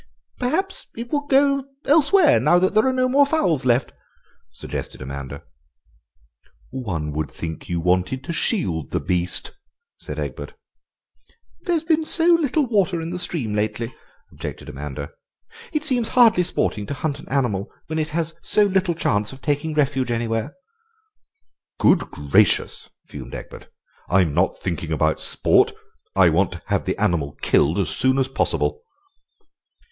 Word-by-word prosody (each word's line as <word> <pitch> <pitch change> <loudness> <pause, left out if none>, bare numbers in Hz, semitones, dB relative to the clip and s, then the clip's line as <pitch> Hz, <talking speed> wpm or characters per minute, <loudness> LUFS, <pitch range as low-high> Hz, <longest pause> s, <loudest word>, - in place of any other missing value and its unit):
"Perhaps 355 +10 -1
it 235 +1 -6
will 290 0 -1
go 275 0 +3 0.2
elsewhere 315 +3 +5
now 175 - +4
there 200 +6 +3
are - - +3
no 255 0 +1
more 275 +3 +5
fowls 275 - +1
left," 125 +1 +2 0.6
suggested - - -7
Amanda. 70 +1 -7 1.3
"One 95 -13 -3
would 75 -1 -3
think 80 -1 -7
you 85 -1 -1
wanted 90 +9 0
to 170 - -4
shield 85 - -1
the - - -1
beast," 90 0 -1 0.5
said - - -7
Egbert. - - -5 1.1
"There's 340 -4 0
been 320 -1 +2
so 325 +1 +3
little 310 -3 +2
water 195 -7 +1
in 165 +1 -5
the 180 - -3
stream 155 -11 -1
lately," 110 +3 -2 0.4
objected - - -7
Amanda; 70 0 -6 0.6
"it 305 -1 -1
seems 250 -6 +1
hardly 230 -6 +5
sporting 105 - -1
to 140 - -4
hunt 145 +1 -3
an - - -13
animal 120 -7 0 0.2
when 160 0 -3
it 155 0 -1
has 165 +1 -1
so 210 - +3
little 190 -3 +1
chance 105 -9 0
of 135 - -11
taking 150 +1 -1
refuge 135 -4 +1
anywhere." 115 +2 -2 1.2
"Good 180 - +3
gracious!" 75 -1 +1 0.2
fumed 65 -3 -9
Egbert, - - -9 0.4
"I'm 90 -5 +3
not 90 +4 +1
thinking 85 -3 -4
about 80 0 +1
sport. - - +3 0.4
I 95 -2 +6
want 90 +3 +1
to 90 - -9
have - - -1
the - - -2
animal 75 -5 0
killed 80 +6 +3
as 95 -5 0
soon 130 +9 +1
as 135 -1 +2
possible." 135 - -1
135 Hz, 150 wpm, -22 LUFS, -, 1.3 s, I